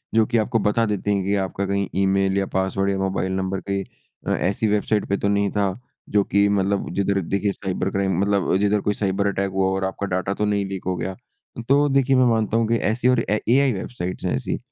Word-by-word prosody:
जो 110 -1 +5
कि 115 +1 0
आपको 115 - 0
बता 110 +2 +1
देती 105 -1 -1
हैं 100 - -1
कि 100 +1 +1
आपका 95 +1 -3
कहीं 100 0 -1
ईमेल 95 0 +2
या 95 - +1
पास्वर्ड 95 +1 0
या 95 - -1
मोबाइल 95 -1 -1
नम्बर 95 0 -2
कहीं 100 0 -1 0.4
अ, - - +1
ऐसी 100 +5 0
वेबसाइट् 105 0 +1
पे 100 - +1
तो 100 - -1
नहीं 100 0 +1
था, 100 -1 +1 0.4
जो 105 -1 +3
कि 100 +1 +2
मतलब 100 0 0
जिधर 100 0 +1
देखिए 100 +3 -1
साइबर 95 -1 -3
क्राइम 95 -2 0
मतलब 100 -2 +1
जिधर 105 +1 +1
कोई 105 - 0
साइबर 100 0 0
अटैक 100 0 -1
हुआ 95 0 +1
हो 95 - 0
और 95 - -2
आपका 95 +1 -3
डेटा 95 +1 -1
तो 105 - -1
नहीं 100 -1 0
लीक 95 -1 -5
हो 95 - 0
गया। 95 +2 -4 0.5
तो 145 +2 +4
देखिए 135 -1 +3
मैं 130 -1 +5
मानता 110 -1 +1
हूँ 115 -1 +1
कि 115 - +2 0.2
ऐसी 120 +3 0
और 125 -2 +3
एआई 125 +5 +2
वेबसाइट्स 95 -3 -5
हैं 90 - 0
ऐसी। 130 - -2
100 Hz, 230 wpm, -22 LUFS, 95-105 Hz, 0.5 s, जो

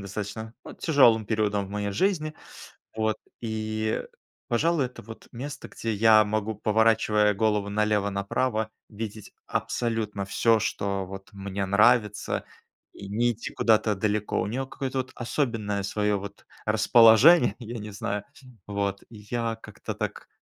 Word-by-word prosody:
достаточно, 105 +3 -6
ну, - - -9
тяжелым 120 -9 +4
периодом 105 -3 0
в - - -13
моей 105 0 -2
жизни. 155 - 0 0.6
Вот 110 -1 0 0.2
и, 110 -1 -2 0.5
пожалуй, 150 +3 +2
это 125 - -12
вот 110 +2 -11
место, 140 +4 -7
где 115 -1 -4
я 110 +1 +6
могу, 110 +1 -2
поворачивая 105 -1 +3
голову 105 -1 +1
налево-направо, 105 +2 0 0.2
видеть 110 -1 -7
абсолютно 110 -4 -2
всё, 110 +2 +2
что 100 -1 -2
вот 95 +1 -9
мне 100 0 -4
нравится. 105 +2 +2 0.5
И 100 - -10
не 120 +4 +1
идти 115 - -7
куда-то 110 -2 +3
далеко. 105 0 0
У 95 - -1
нее 125 +6 -2
какое-то 135 0 -4
вот 130 0 -3
особенное 115 -6 -1
свое 105 +1 0
вот 100 0 -8 0.2
расположение, 120 +6 +6
я 120 -1 -7
не 105 0 -7
знаю, 100 +1 -3 0.4
вот. 100 -1 -2
Я 115 +1 -3
как-то - - -7
так, - - -5
110 Hz, 135 wpm, -26 LUFS, 100-115 Hz, 0.6 s, я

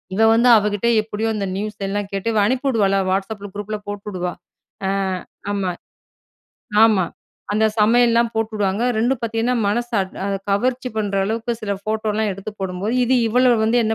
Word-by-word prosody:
இவள் 225 +2 +5
வந்து 240 +2 +4
அவ 210 0 +1
கிட்ட 205 +3 -1 0.2
எப்படியோ 220 +1 -2
அந்த 200 -2 -2
நியூஸ் 210 0 -4
எல்லாம் 205 0 -3
கேட்டு, 195 +2 -3
இவள் 210 -2 +3
அனுப்பி 260 +4 0
விடுவால்ல, 200 -6 +2
Whatsappல 200 +1 -3
குரூப்பில 210 +1 -4
போட்டுடுவா. 195 -3 -4 0.5
அ - - +1 0.6
ஆமா. 195 -3 -1 1.1
ஆமா. 205 -5 +4 0.5
அந்த 220 +1 +3
சமையல்லாம் 235 +1 +4
போட்டுடுவாங்க. 215 -1 -1 0.2
ரெண்டும் 245 +2 +1
பார்த்தீங்கன்னா 230 +2 0
மனச 240 +4 -1 0.3
அ - - -1 0.2
கவர்ச்சி 250 +5 0
பண்ணுற 205 -2 -1
அளவுக்கு 230 +3 -2
சில 205 -2 -2
ஃபோட்டோலாம் 215 0 -1
எடுத்து 195 +3 -7
போடும்போது, 190 +4 -2
இது 260 - +2
இவள 250 +2 +4
வந்து 225 +2 +2
என்ன 220 +1 +1
215 Hz, 155 wpm, -21 LUFS, 200-230 Hz, 1.1 s, இவள்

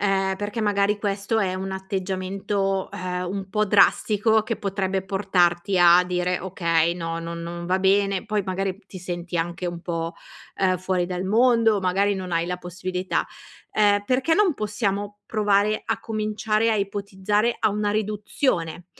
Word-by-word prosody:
uhm, 195 -1 +1
perché 205 +3 -4
magari 205 -1 +1
questo 200 +1 -1
è 190 -3 0
un 190 +1 -4
atteggiamento, 190 +1 -2
ehm, 180 0 -3
un 195 0 -4
po' 215 +2 +1
drastico 210 +2 +3
che 225 +1 -3
potrebbe 195 -2 -2
portarti 190 -1 +1
a 175 0 +7
dire: 180 0 -1
"Okay, 170 -2 +1
no 165 -1 -4
non 170 0 -6
non 170 +1 -6
va 185 +1 +1
bene", 195 0 +2
poi 210 -1 0
magari 190 +1 -2
m 185 - -19
ti 190 - -9
senti 175 -1 -5
anche 170 +2 -2
un 175 -1 -4
po', 165 -1 -3 0.5
uhm, 185 -1 +3
fuori 185 -1 0
dal 180 0 -3
mondo 225 0 +3
magari 195 +2 +1
non 185 -2 -5
hai 165 0 +1
la 180 0 -3
possibilità. 180 +1 -3 0.5
Ehm, 205 -1 +4
perché 260 +8 +2
non 390 -4 +3
possiamo 205 -2 -2
provare 210 0 +2
a - - -1
cominciare 215 0 0
a 220 - +2
ipotizzare 205 +2 -1
a - - +2
una 210 0 -1
riduzione 205 - -1
195 Hz, 160 wpm, -24 LUFS, 180-210 Hz, 0.5 s, a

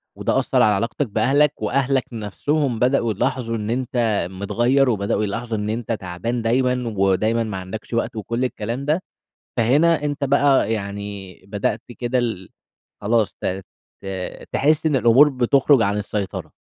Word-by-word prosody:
وده - - 0
أثَّر 130 - +1
على 105 -2 +5
علاقتَك 115 +6 -1
بأهلَك، 140 +7 +2
وأهلَك 135 +4 +1
نفسهم 115 - -1
بدأوا 125 -3 +2
يلاحظوا 115 +3 -1
إن 105 0 -4
أنتَ 120 -6 0
متغيِّر، 120 +8 +1
وبدأوا 105 -1 0
يلاحظوا 115 +2 -3
إن 105 +1 -3
أنتَ 115 +1 -3
تعبان 110 +4 -3
دايمًا، 125 0 0
ودايمًا 110 +4 +2
ما 105 -4 -4
عندكش 95 +5 -7
وقت، 115 +1 -1
وكل 115 +4 -2
الكلام 120 +3 -4
ده. 155 +5 +1 0.6
فهنا 145 +7 +3
أنتَ 145 -1 -2
بقى 140 -3 +3
يعني 100 -2 -5
بدأت 105 +2 -2 0.2
كده 125 +1 0
ال 110 -7 -2 0.5
خلاص 110 0 +1
ت - - -4 0.6
ت - - -10 0.5
تحس 155 +3 +2
إن 150 -3 +2
الأمور 130 +4 +6
بتخرُج 135 0 +3
عن 105 -1 +1
السيطرة. 100 -1 -4
115 Hz, 150 wpm, -21 LUFS, 105-130 Hz, 0.6 s, الأمور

